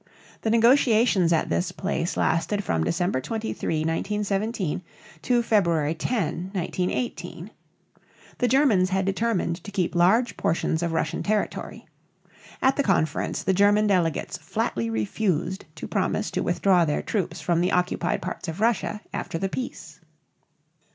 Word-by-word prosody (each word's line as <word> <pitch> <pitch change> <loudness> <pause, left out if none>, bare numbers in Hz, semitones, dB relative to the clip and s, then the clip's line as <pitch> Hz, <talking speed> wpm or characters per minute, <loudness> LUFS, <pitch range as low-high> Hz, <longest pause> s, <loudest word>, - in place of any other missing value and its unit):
The 220 - -1
negotiations 230 -5 +4
at 165 - +1
this 180 - 0
place 185 -3 -2
lasted 200 +5 +1
from 80 - 0
December 170 - 0
23, 215 - -2
1917, 195 +2 -1 0.4
to 240 -1 +2
February 170 -9 +2
10, 180 -3 -2
1918. 185 +5 -3 0.9
The 245 - +2
Germans 235 -8 +3
had 190 0 0
determined 195 -4 -1
to - - -8
keep 185 -4 -1
large 200 +7 +3
portions 160 0 0
of 170 -1 -1
Russian 160 -2 -1
territory. 210 0 -2 0.8
At 265 +1 +3
the - - +3
conference 170 - 0
the 190 - +2
German 205 +2 +4
delegates 180 -6 0
flatly 115 -1 -2
refused 170 - -1
to - - -7
promise - - -1
to - - -1
withdraw 185 -3 +3
their 150 -2 -1
troops 180 -5 -2
from 165 +2 +1
the 180 - +1
occupied 180 0 0
parts 180 0 -5
of 165 +3 -5
Russia 220 -1 0
after - - -3
the 195 +3 -2
peace. 250 +5 -6
190 Hz, 140 wpm, -25 LUFS, 165-215 Hz, 0.9 s, negotiations